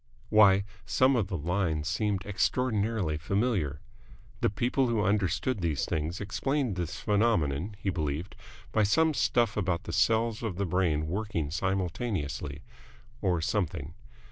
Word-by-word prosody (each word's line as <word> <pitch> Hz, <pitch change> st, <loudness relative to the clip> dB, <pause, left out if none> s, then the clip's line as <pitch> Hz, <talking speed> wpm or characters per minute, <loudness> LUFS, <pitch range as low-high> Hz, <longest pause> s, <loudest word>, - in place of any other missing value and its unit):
Why, 100 Hz, -3 st, +6 dB, 0.2 s
some 130 Hz, +9 st, +3 dB
of 110 Hz, -5 st, +1 dB
the 95 Hz, -3 st, -3 dB
lines 80 Hz, -1 st, -1 dB
seemed 100 Hz, -2 st, -1 dB
extraordinarily 105 Hz, -5 st, 0 dB
familiar. 90 Hz, -, -1 dB, 0.6 s
The -, -, +2 dB
people 125 Hz, +5 st, +1 dB
who 110 Hz, -3 st, +1 dB
understood 105 Hz, +3 st, 0 dB
these 80 Hz, -5 st, 0 dB
things 80 Hz, +3 st, -2 dB
explained 125 Hz, +3 st, -1 dB
this 85 Hz, -3 st, -4 dB
phenomenon, 100 Hz, -5 st, +1 dB
he 100 Hz, -2 st, -1 dB
believed, 80 Hz, +1 st, -3 dB, 0.4 s
by 110 Hz, -, +2 dB
some 160 Hz, +10 st, +3 dB
stuff 120 Hz, -6 st, +2 dB
about 90 Hz, -3 st, 0 dB
the -, -, -6 dB
cells 115 Hz, 0 st, +2 dB
of 110 Hz, -6 st, -3 dB
the 100 Hz, +2 st, -1 dB
brain 85 Hz, -4 st, +1 dB
working 85 Hz, -4 st, -2 dB
simultaneously 90 Hz, -, -2 dB, 0.6 s
or 90 Hz, -4 st, +1 dB
something. 80 Hz, -5 st, -2 dB
100 Hz, 135 wpm, -29 LUFS, 85-110 Hz, 0.6 s, Why